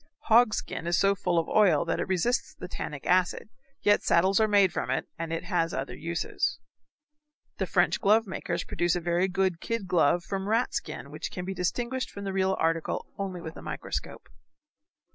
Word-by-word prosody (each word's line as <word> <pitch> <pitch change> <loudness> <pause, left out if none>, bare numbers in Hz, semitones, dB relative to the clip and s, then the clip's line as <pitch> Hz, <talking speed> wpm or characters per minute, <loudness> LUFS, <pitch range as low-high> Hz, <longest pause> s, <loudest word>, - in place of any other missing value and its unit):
Hog 235 -2 +6
skin 165 - -4
is 170 0 +2
so 195 0 +4
full 180 -3 -1
of 165 - +1
oil 195 -8 +4
that - - -1
it - - -2
resists 190 +7 0
the 180 - -8
tannic 150 -5 -6
acid, 185 +3 +1 0.3
yet 205 0 +4
saddles 190 +4 +3
are 220 - +4
made 200 -4 +4
from - - -2
it, - - -1
and 165 -1 -4
it 165 - -2
has 170 -4 0
other 135 +1 -4
uses. 170 +2 -2 1.0
The - - 0
French - - +2
glove 220 +1 +4
makers 190 - -3
produce 175 0 0
a - - 0
very 175 +2 +1
good 185 -2 0
kid 230 -3 -2
glove 175 -1 +3
from 195 +2 -3
rat 230 +3 +1
skin - - -5
which - - -5
can 180 - -6
be 190 - -3
distinguished 240 +8 -2
from 200 - -8
the 195 -1 -3
real 190 0 +1
article 165 0 0
only 190 -3 -4
with 160 -1 -7
a - - -9
microscope. - - -5
185 Hz, 195 wpm, -28 LUFS, 170-200 Hz, 1.0 s, Hog